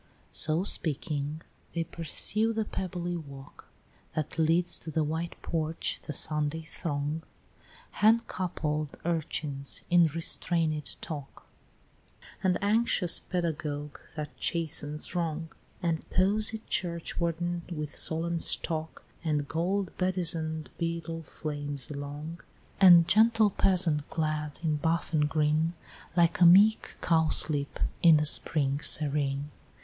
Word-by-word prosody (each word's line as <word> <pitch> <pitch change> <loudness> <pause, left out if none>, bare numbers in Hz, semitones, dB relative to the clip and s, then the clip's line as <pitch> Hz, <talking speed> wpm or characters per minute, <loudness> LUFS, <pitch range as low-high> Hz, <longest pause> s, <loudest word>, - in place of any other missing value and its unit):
X. - - -4
So 160 +3 +1
speaking, 150 -3 -1 0.3
they 165 - +1
pursue 210 +8 -1
the 220 -1 -1
pebbly 175 -3 -4
walk 140 -5 -10 0.5
That 155 +1 -2
leads 170 +2 +3
to - - -5
the 160 0 0
white 160 +3 -3
porch 160 0 -2
the - - -6
Sunday 150 +2 -1
throng, 150 -1 -3 0.7
Hand 225 +2 +4
coupled 155 -5 -3
urchins 150 -4 -2
in 175 -2 +6
restrainëd 160 -1 0
talk, 145 -4 -7 1.0
And 185 -1 +2
anxious 205 -4 +2
pedagogue 150 -5 -3 0.2
that 150 -1 -6
chastens 150 -2 -1
wrong, 165 -2 -2 0.3
And 165 -2 0
posied 215 +4 +1
churchwarden 170 0 -1
with 150 -3 -4
solemn 165 +1 -1
stalk, 160 -1 +2 0.2
And 150 -3 0
gold 185 +4 -1
bedizen'd 165 -4 0
beadle 165 -1 -3
flames 145 -3 -4
along, 145 +3 -6 0.4
And 175 -3 +8
gentle 220 +1 +4
peasant 170 -7 +1
clad 155 -2 -2
in 155 -2 +1
buff 165 +2 -1
and 150 -1 +2
green, 155 +2 +1 0.4
Like 170 +1 +3
a - - +9
meek 205 +5 +5
cowslip 155 -3 +2 0.2
in 165 -3 +7
the 150 - +1
spring 145 -2 +1
serene; 145 -1 +2
XI. - - -28
160 Hz, 115 wpm, -29 LUFS, 150-175 Hz, 1.0 s, a